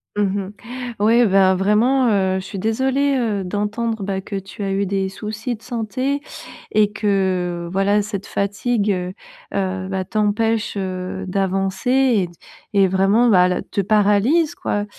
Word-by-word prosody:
Mmh 200 -1 -1
mh, 245 0 -7
ouais, 235 +2 +5
ben 190 -1 +4
vraiment, 220 +7 +3
heu, 190 -2 +1
je - - -7
suis 200 - -7
désolée, 265 +7 +1
heu, 215 -5 -1
d'entendre, 210 +3 -2
bah, 195 0 -2
que 200 +1 -7
tu 195 +2 -7
as 195 - -1
eu 195 0 0
des 195 0 -1
soucis 220 +5 -5
de 220 - -19
santé 255 +4 -2 0.5
et 210 -1 +3
que, 185 -4 0
heu, - - -7
voilà, 200 +2 +2
cette 205 -1 -5
fatigue, 205 +2 -1
heu 180 -1 -2 0.4
heu, 190 -1 -2
bah, 190 -1 -2
t'empêche, 215 +2 0
heu, 185 -1 -4
d'avancer 195 +3 -1
et 255 -8 +3
d 175 - -16 0.4
et 195 -1 +5
vraiment, 195 +6 +3
bah, 180 -3 +5
le 180 - -1
te 200 - -2
paralyse, 215 - +3
quoi. 205 0 -2
205 Hz, 165 wpm, -20 LUFS, 190-225 Hz, 0.5 s, ouais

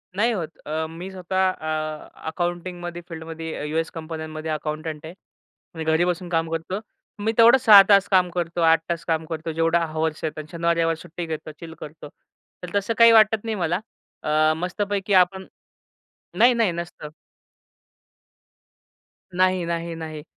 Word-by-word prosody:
नाही 230 +5 +2
होत. 165 -7 -4
अ, 160 +1 -2
मी 170 +4 -8
स्वतः 190 0 0
अ, 155 -2 -4 0.2
अकाउंटिंगमध्ये 175 +1 -4
फील्डमध्ये 160 -1 -6
अ, - - -5
यूएस 160 +2 -1
कंपन्यांमध्ये 160 -1 -6
अकाउंटंट 155 0 -4
आहे. 160 - -8 0.6
मी 160 - -4
घरी 160 +2 +2
बसून 180 0 -2
काम 165 -1 0
करतो. 165 +4 -3 0.4
मी 220 +2 0
तेवढं 235 +2 +8
6 220 -6 +9
तास 200 -1 +6
काम 185 -2 +4
करतो, 170 0 -3
8 165 0 +5
तास 170 -1 -2
काम 160 -1 -1
करतो, 160 0 -5
जेवढं 165 +1 +2
हॉवर्स 160 0 -2
आहेत 155 -1 -3
अन् 155 - -6
शनिवार-रविवार 170 -1 +1
सुट्टी 170 +1 -7
घेतो, 155 -1 -6
चिल 165 -1 -9
करतो. 150 0 -10 0.5
तर 180 - -5
तसं 200 +3 0
काही 230 0 +8
वाटत 220 -1 +5
नाही 225 -1 -2
मला. 175 -2 0 0.4
अ, 155 0 +3
मस्तपैकी 200 +3 -2
आपण 190 +1 -8 0.9
नाही, 245 +1 +6
नाही 225 -6 +2
नसतं. 170 -2 -7 2.3
नाही, 185 0 +2
नाही, 170 0 -3
नाही. 155 -2 -7
170 Hz, 155 wpm, -23 LUFS, 160-185 Hz, 2.3 s, 6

